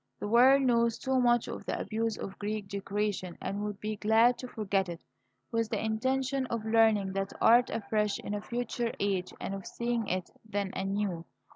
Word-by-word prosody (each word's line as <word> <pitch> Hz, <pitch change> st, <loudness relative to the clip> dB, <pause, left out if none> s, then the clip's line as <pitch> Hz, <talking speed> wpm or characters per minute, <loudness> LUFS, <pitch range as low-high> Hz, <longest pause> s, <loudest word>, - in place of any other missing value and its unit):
The -, -, -3 dB
world 260 Hz, +5 st, +6 dB
knows 235 Hz, -2 st, +3 dB
too 265 Hz, +1 st, 0 dB
much 240 Hz, -1 st, +3 dB
of -, -, -6 dB
the -, -, -1 dB
abuse 225 Hz, 0 st, -2 dB
of 195 Hz, -, -7 dB
Greek 210 Hz, 0 st, -3 dB
decoration, 200 Hz, -2 st, -3 dB
and 200 Hz, +1 st, -3 dB
would 210 Hz, -1 st, -4 dB
be 215 Hz, 0 st, -3 dB
glad 225 Hz, +4 st, +4 dB
to 255 Hz, -, -6 dB
forget 195 Hz, -5 st, -1 dB
it, 170 Hz, -1 st, -7 dB, 0.5 s
with 230 Hz, -1 st, 0 dB
the -, -, -1 dB
intention 260 Hz, +4 st, 0 dB
of 230 Hz, -2 st, -3 dB
learning 220 Hz, -3 st, +3 dB
that 195 Hz, 0 st, -2 dB
art 240 Hz, +2 st, +6 dB
afresh 210 Hz, -1 st, 0 dB
in 205 Hz, -, -5 dB
a 205 Hz, -, -2 dB
future 240 Hz, 0 st, -2 dB
age 195 Hz, -2 st, 0 dB
and -, -, -4 dB
of 195 Hz, -1 st, -6 dB
seeing 235 Hz, -2 st, -2 dB
it 185 Hz, 0 st, -2 dB
then 205 Hz, -3 st, -3 dB
anew. 195 Hz, -3 st, -2 dB
215 Hz, 185 wpm, -30 LUFS, 200-235 Hz, 0.5 s, world